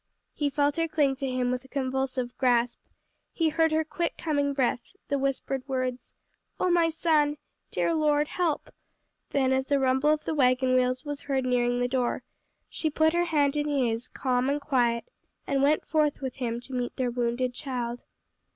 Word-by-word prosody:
He 290 -1 0
felt 285 +1 +1
her 330 0 +1
cling 290 -4 +2
to 270 -1 -2
him 250 -1 0
with 250 0 -2
a - - -15
convulsive 260 -2 -2
grasp, 245 -2 +2 0.5
he 325 -2 +1
heard 320 +1 +2
her 315 0 +2
quick 340 +2 -3
coming 285 -3 0
breath, 260 -3 +1 0.3
the 280 -1 +1
whispered 270 0 -1
words, 255 -2 -3 0.4
"Oh, 365 - +2
my 340 -1 +4
son! 310 -2 +2 0.3
Dear 335 - 0
Lord, 300 -2 +2
help!" 335 -4 -2 0.6
then, 265 -2 +1
as 265 0 0
the 285 - +3
rumble 265 +2 +2
of 305 0 +1
the - - -1
wagon 255 -2 +3
wheels 255 +2 +1
was 290 -1 -4
heard 270 -2 -1
nearing 245 -1 +1
the 245 - +1
door, 250 -1 -1 0.4
she 315 - -2
put 315 +1 +2
her 345 0 +2
hand 295 -4 +2
in 295 0 0
his, 250 -4 0
calm 255 0 0
and 285 +1 +1
quiet, 245 -5 +1 0.4
and 275 -1 0
went 290 +2 +3
forth 305 -2 +1
with 265 -2 -5
him 235 -2 -2
to 260 +2 -10
meet 245 -1 -2
their 250 -2 -1
wounded 245 +1 -1
child. 245 -3 -4
270 Hz, 185 wpm, -27 LUFS, 250-295 Hz, 0.6 s, my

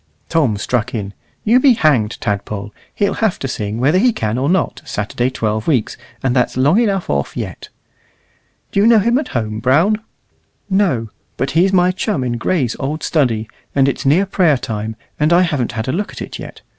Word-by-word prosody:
Tom 145 -11 +2
struck 120 +3 -1
in 100 -2 -4 0.3
"You 235 +4 +4
be 260 -1 +6
hanged, 140 - +2
Tadpole. 100 0 -3 0.2
He'll 200 - +1
have 220 -5 +2
to 135 - -4
sing, 105 -3 -3
whether 150 +9 +3
he 245 +4 +4
can 110 - -2
or 140 +3 0
not, 185 0 0
Saturday 115 +4 -2
twelve 110 -4 -2
weeks, 130 -9 +1 0.3
and 130 -1 +1
that's 125 0 +1
long 145 - +4
enough 200 -6 0
off 70 -1 -2
yet." - - -6 1.0
"Do - - +1
you 205 - +5
know 230 -1 +6
him 235 +5 +3
at 305 - -4
home, 110 -1 -3
Brown?" 165 - +3 0.7
"No; 155 - +1 0.3
but 135 - -1
he's 180 +4 +3
my 180 -1 +4
chum 185 - -2
in 120 -1 -2
Gray's 130 -3 0
old 150 +3 -3
study, 115 -8 +1 0.3
and 135 -1 +4
it's 140 - -1
near 155 +9 +3
prayer 180 -7 +2
time, 110 -3 -4 0.2
and 150 +2 +2
I 175 +2 +5
haven't 145 -9 -1
had 110 -1 -3
a - - +1
look 200 +5 -2
at - - -9
it - - -8
yet. - - -10
135 Hz, 195 wpm, -18 LUFS, 115-185 Hz, 1.0 s, be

